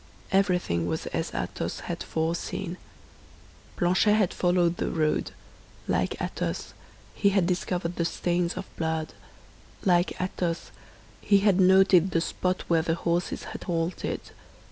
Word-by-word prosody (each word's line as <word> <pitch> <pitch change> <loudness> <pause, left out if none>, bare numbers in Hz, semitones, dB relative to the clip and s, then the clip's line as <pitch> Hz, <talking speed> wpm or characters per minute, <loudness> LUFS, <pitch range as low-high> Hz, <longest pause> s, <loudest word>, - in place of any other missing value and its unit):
Everything 180 - +2
was 80 -2 -2
as - - -3
Athos - - -3
had - - -5
foreseen. 170 +2 -2 1.0
Planchet 185 +4 +3
had 205 -4 +2
followed 175 -1 +2
the - - -1
road; 155 -2 0 0.6
like - - 0
Athos, - - -3 0.4
he 200 - +3
had 195 -3 +2
discovered 180 -1 -1
the 170 - +1
stains 175 +1 0
of - - -4
blood; 160 -1 -2 0.7
like 175 -1 +2
Athos, 175 -2 -2 0.5
he 200 -1 +4
had 195 -2 +4
noted 190 -1 +6
the 170 - +1
spot 185 +2 -1
where 165 -1 +3
the 165 0 0
horses 170 +1 -1
had - - -7
halted. 170 0 -2
175 Hz, 130 wpm, -27 LUFS, 170-185 Hz, 1.0 s, noted